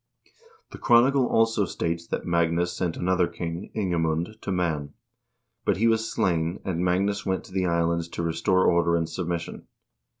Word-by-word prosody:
The - - -10
chronicle 125 +2 +4
also 115 -2 +2
states 85 -1 -3
that - - -3
Magnus 85 +1 +1
sent 90 -2 -2
another 90 -1 +1
king, 85 +1 -6
Ingemund, 85 0 -1
to - - -4
Man; 80 -6 -2 0.7
but - - +1
he 110 - +1
was 115 0 +1
slain, 85 0 0
and 90 -2 -1
Magnus 100 +3 +1
went 95 -1 -1
to - - -15
the 95 -1 0
Islands 85 0 0
to 85 - -1
restore 90 +3 +1
order 85 0 +3
and 85 -1 0
submission. 85 -1 -4
90 Hz, 160 wpm, -25 LUFS, 85-95 Hz, 0.7 s, chronicle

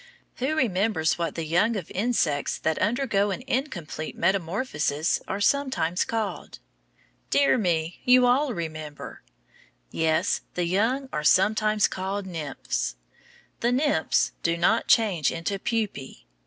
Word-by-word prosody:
Who 270 +5 -1
remembers 200 - +1
what 170 - -2
the 165 - -3
young 175 +9 +2
of 185 -6 -5
insects 185 -9 0
that 160 0 -1
undergo 210 -3 +1
an 200 +6 -4
incomplete 175 - -4
metamorphosis 170 - 0
are 195 - -3
sometimes 205 - +1
called? 225 -3 -4 0.7
Dear 280 - +4
me, 170 -4 -1
you 250 0 +6
all 260 +3 +3
remember! 155 -3 -7 0.7
Yes, 160 -1 +1
the 180 - 0
young 225 +10 0
are 150 - -2
sometimes 215 +4 +3
called 195 +1 -4
nymphs. 145 - -3 0.6
The 240 - +1
nymphs 260 - +1
do 170 0 0
not 215 +7 +2
change 190 - +3
into 180 +4 -3
pupæ. 215 - -3
195 Hz, 125 wpm, -25 LUFS, 160-230 Hz, 0.7 s, you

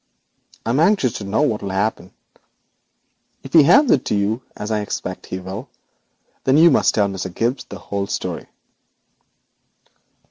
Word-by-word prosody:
I 115 - 0
am 130 - +1
anxious 165 - +3
to - - -7
know 105 +9 +1
what 110 -8 0
will 100 - -4
happen. 95 -1 -2 1.3
If 135 - -11
he 165 - +9
hands 250 - +5
it 130 - +3
to - - 0
you, 105 +4 0
as 105 +2 -5
I 110 - +1
expect 105 - -5
he 95 - -4
will, 95 +7 -7 0.7
then 135 +2 +3
you 165 +1 +7
must - - +3
tell 105 -2 +3
Mr. 95 -1 -5
Gibbes 120 +8 -2
the 100 - -7
whole 100 +1 -4
story.' - - -4
110 Hz, 165 wpm, -20 LUFS, 100-135 Hz, 1.3 s, he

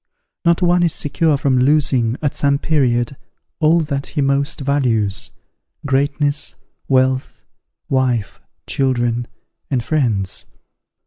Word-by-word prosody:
not 170 +1 +3
one 175 0 +4
is 170 -2 +2
secure 150 +1 +1
from 135 -2 +1
losing, 130 -4 +2
at 145 - +1
some 140 -1 +1
period, 130 -5 +1 0.4
all 165 +1 +4
that 140 -3 -3
he 150 - -5
most 140 +2 0
values, 120 -8 0 0.6
greatness, 145 +1 0 0.3
wealth, 130 0 +1 0.4
wife, 125 -5 0 0.3
children, 120 -3 0 0.4
and 130 -4 0
friends. 115 -10 0
140 Hz, 110 wpm, -19 LUFS, 125-150 Hz, 0.6 s, one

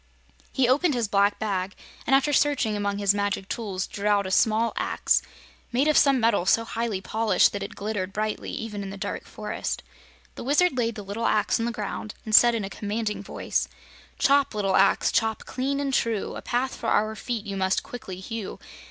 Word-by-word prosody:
He 265 -3 +2
opened 290 +4 +3
his 235 -3 0
black 200 0 +2
bag 195 -2 -2 0.3
and 270 - +5
after 275 +2 +2
searching 270 -8 +2
among 200 -1 -1
his 200 -1 +3
magic 200 -1 -1
tools 195 -5 -3
drew 205 0 -4
out 205 -1 +3
a 190 - -4
small 220 +3 +2
axe, - - +1 0.5
made 260 +5 +2
of 305 - +3
some 275 -2 +5
metal 225 -6 +2
so 230 +3 +3
highly 225 -4 -2
polished 215 -3 +2
that 205 - -4
it 200 +2 -6
glittered 200 -2 -3
brightly 215 +2 -3
even 210 -2 -5
in 195 - -5
the 195 - -7
dark 200 +1 -4
forest. 210 -1 -4 0.5
The - - -8
Wizard 290 +4 +3
laid 230 -2 0
the 210 - -7
little 210 +4 -2
axe 215 +2 +2
on 230 - 0
the - - -1
ground 215 -1 -5
and 215 - -4
said 240 +2 +7
in 215 -3 -2
a - - -4
commanding 210 0 -3
voice: 200 - -2 0.5
"Chop, 280 -4 +3
Little 195 -2 +1
Axe, 195 - +4
chop 220 -1 0
clean 270 +2 -2
and 275 -1 -1
true; 225 -5 0
A - - -6
path 255 +2 -1
for - - -5
our 215 +1 +1
feet 230 -1 -4
you 200 -1 -4
must 190 0 +1
quickly 190 -7 -8
hew. 220 +1 -6
215 Hz, 205 wpm, -25 LUFS, 200-240 Hz, 0.5 s, said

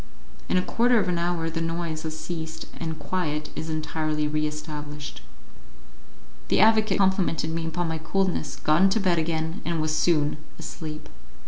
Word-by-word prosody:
In - - +3
a 180 - +3
quarter 240 +4 +3
of 200 - +1
an 175 -1 +1
hour 170 -1 0
the 165 0 -2
noise 165 -1 -2
has 160 0 -4
ceased, 160 0 -5
and 160 -1 -3
quiet 155 -5 -2
is 160 - -4
entirely 155 -1 -1
re 155 0 +1
established. 150 -1 -6 1.3
The - - +3
advocate 215 -2 +5
complimented 190 -5 +2
me 165 0 -2
upon 175 +1 -1
my 160 0 -2
coolness, 190 +3 0
got 155 +3 +3
into 195 +3 +5
bed 180 -4 +3
again, 160 0 -1
and 170 -1 -1
was 155 0 +1
soon 155 -2 +2 0.2
asleep. 155 -2 -6
160 Hz, 160 wpm, -26 LUFS, 155-175 Hz, 1.3 s, advocate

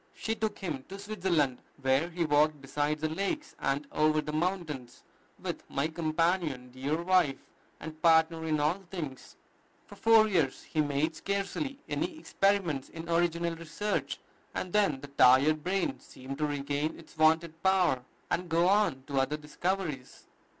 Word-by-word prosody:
She 220 - -2
took 220 -1 -2
him 155 -9 -4
to 195 - -7
Switzerland, 180 -10 0 0.2
where 135 +5 +2
he 170 -1 -1
walked 150 0 +3
beside 145 +2 -1
the 155 +1 -1
lakes 200 - -3
and 140 +2 0
over 155 0 +3
the 150 0 -4
mountains 155 -7 -3 0.3
with - - -5
"my 140 +3 0
companion, 160 -5 0
dear 140 +5 -2
wife, 175 -7 +3 0.4
and 155 0 -9
partner 160 0 +4
in 155 -1 +1
all 155 +6 +1
things." 150 -9 -6 0.5
For - - -13
four 225 -1 +5
years 165 -10 0
he 155 - 0
made 150 +2 0
scarcely 200 - -2
any 335 0 -2
experiments 195 - 0
in 165 0 -8
original 170 0 +1
research, 165 +6 -3 0.4
and 180 - -3
then 195 -11 +2
the 145 - -8
tired 140 +3 +5
brain 190 +2 -1
seemed 135 +2 -9
to 150 - +1
regain 145 +2 -2
its 165 - -15
wonted 160 +1 +2
power, 185 -9 +3 0.3
and 180 0 -1
go 170 +2 +3
on 200 -10 +2
to 140 -2 -1
other 135 +3 0
discoveries. 150 -2 -3
160 Hz, 155 wpm, -30 LUFS, 145-185 Hz, 0.5 s, four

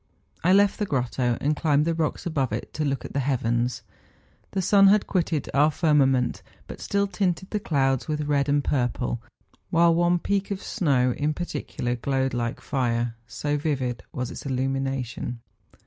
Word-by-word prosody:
I 180 - +4
left 200 +1 +4
the 210 - 0
grotto, 125 -3 0
and 150 +2 +1
climbed 150 -1 +2
the 165 - +1
rocks 160 -2 -2
above 140 -8 0
it 105 - -4
to 155 - -2
look 140 -2 -1
at - - -8
the 140 - 0
heavens. 125 -2 0 0.7
The 195 - -2
sun 195 +1 +6
had 205 +1 +5
quitted 165 -6 -1
our 145 +3 +5
fir¬ 155 0 +1
mament, 130 -3 +2 0.2
but - - -9
still 200 0 +1
tinted 190 -1 -2
the 210 - 0
clouds 135 -8 0
with 150 -1 -1
red 145 -1 +1
and 145 0 +2
purple, 120 -3 -1 0.5
while 170 0 +4
one 175 +1 +3
peak 200 +3 -1
of 200 -1 -4
snow 135 - +1
in 150 +1 -1
particular 145 -7 -3
glowed 135 +2 -1
like 120 -1 -2
fire, 120 -3 -1
so 145 +6 -2
vivid 130 -7 -2
was 125 -1 -4
its - - -8
illumination. 135 -2 -2
140 Hz, 175 wpm, -25 LUFS, 125-170 Hz, 0.7 s, sun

